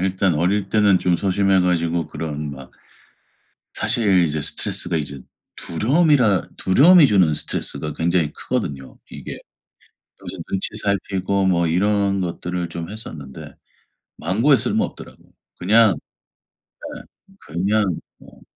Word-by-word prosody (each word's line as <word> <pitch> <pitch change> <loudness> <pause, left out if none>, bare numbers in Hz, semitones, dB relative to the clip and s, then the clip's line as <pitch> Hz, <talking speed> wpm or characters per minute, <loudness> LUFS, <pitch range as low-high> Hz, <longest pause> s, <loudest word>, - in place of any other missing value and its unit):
일단 95 -1 +1
어릴 95 +5 0
때는 105 -3 +4
좀 90 -1 +1
소심해 95 +1 +2
가지고 85 -2 0
그런 75 -2 -5
막 70 -1 -11 1.0
사실 95 -6 +3
이제 75 0 -2
스트레스가 85 +3 -3
이제 70 -3 -5 0.4
두려움이라 125 - +2
두려움이 150 - +6
주는 95 - +3
스트레스가 75 0 -4
굉장히 85 -2 0
크거든요 70 -2 -4
이게. - - -8 0.8
여기서 - - -8
눈치 95 - -2
살피고 100 -1 -1
뭐 85 -2 +2
이런 100 +3 +1
것들을 90 -1 -4
좀 85 +1 -6
했었는데 80 -11 -9 0.6
만고에 115 - +3
쓸모 - - 0
없더라고. - - -9 0.4
그냥 105 +1 +4 1.0
네. - - -9 0.5
그냥 95 +1 0 0.2
뭐 - - -18
90 Hz, 280 characters per minute, -21 LUFS, 80-100 Hz, 1.0 s, 두려움이